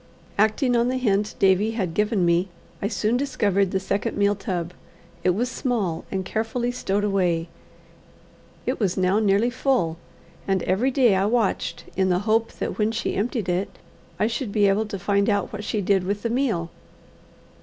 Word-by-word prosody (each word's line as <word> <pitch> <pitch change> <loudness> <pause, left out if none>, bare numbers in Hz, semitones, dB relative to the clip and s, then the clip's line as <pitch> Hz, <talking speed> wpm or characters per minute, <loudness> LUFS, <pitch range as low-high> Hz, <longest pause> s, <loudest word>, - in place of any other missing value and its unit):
Acting 220 +5 +2
on 235 0 +3
the 255 +1 0
hint 210 -4 0
Davie 195 +3 +3
had 185 -6 -1
given 210 -1 +1
me, 170 +2 +2 0.3
I 200 - 0
soon 215 +2 0
discovered 205 -8 +1
the 190 - 0
second 195 +1 -2
meal 205 0 +3
tub. 180 -3 -4 0.5
It 180 -1 +3
was 240 +5 0
small, 230 - -2
and 190 -1 -3
carefully 230 +4 -1
stowed 205 -4 -1
away. 180 -5 +1 1.2
It - - -1
was 195 -5 0
now 185 +2 +3
nearly 215 +3 +2
full, 245 -11 0 0.5
and 195 -2 +1
every 200 +9 +1
day 250 -5 +4
I 190 +1 +2
watched 225 -3 0
in 190 -1 +2
the 180 - +3
hope 225 +1 +2
that - - -4
when 215 +1 +2
she 230 - -2
emptied 220 -1 -1
it, 180 +2 -2 0.4
I - - +2
should 230 0 -2
be 205 -1 +3
able 205 +2 +1
to 205 -2 -5
find 200 +2 +1
out 205 0 0
what 210 0 -5
she 210 0 -1
did 195 -1 +2
with 200 +2 -2
the 230 - -1
meal. 225 -10 0
205 Hz, 180 wpm, -24 LUFS, 190-230 Hz, 1.2 s, day